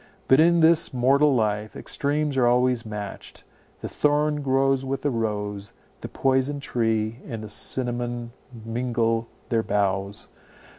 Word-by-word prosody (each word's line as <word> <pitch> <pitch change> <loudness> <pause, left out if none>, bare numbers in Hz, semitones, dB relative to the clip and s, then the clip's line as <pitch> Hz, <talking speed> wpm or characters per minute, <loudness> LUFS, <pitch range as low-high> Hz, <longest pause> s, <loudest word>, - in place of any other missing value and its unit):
But 130 - +5
in 170 +1 +5
this 160 -3 +4
mortal 135 +3 +3
life 105 -2 -1
extremes 145 0 -1
are 125 -2 +3
always 125 -1 +2
matched; 105 -2 -7 0.4
the - - -4
thorn 150 0 +1
grows 135 0 +1
with 135 0 -4
the 145 - +1
rose, 105 -3 -3 0.3
the - - -6
poison 135 +2 0
tree 115 -3 -1
and 115 -4 -6
the 110 - -8
cinnamon 120 +2 -2 0.3
mingle 115 -1 -1 0.2
their 115 -1 +2
boughs. 100 -1 -1
120 Hz, 135 wpm, -24 LUFS, 110-135 Hz, 0.4 s, But